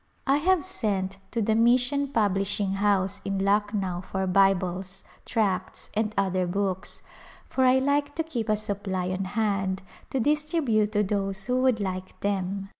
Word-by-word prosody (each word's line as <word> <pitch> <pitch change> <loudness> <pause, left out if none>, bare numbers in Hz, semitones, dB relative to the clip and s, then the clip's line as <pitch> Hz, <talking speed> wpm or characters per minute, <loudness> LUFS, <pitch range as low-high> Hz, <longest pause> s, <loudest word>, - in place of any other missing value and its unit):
I 275 +1 +4
have 355 +1 +2
sent 200 - -1
to 230 -1 -1
the 220 - +2
Mission 250 +5 +3
Publishing 200 -4 0
House 195 -1 +1
in 195 0 -2
Lucknow 200 -2 0
for 190 -1 0
Bibles, 190 0 +1 0.2
tracts 205 -5 -1
and 215 0 0
other 185 -2 +1
books, 195 +1 -2 0.4
for 260 - +1
I 255 +1 +5
like 285 +2 +1
to 325 - 0
keep 245 -9 -4
a 215 - +4
supply 195 -3 -2
on 185 +1 -2
hand 195 -3 0 0.3
to 265 - -1
distribute 290 -6 +1
to 210 -1 +3
those 195 -1 -2
who 255 +1 +1
would 255 -4 +3
like 185 -2 -4
them. 195 0 -2
205 Hz, 155 wpm, -26 LUFS, 190-245 Hz, 0.4 s, I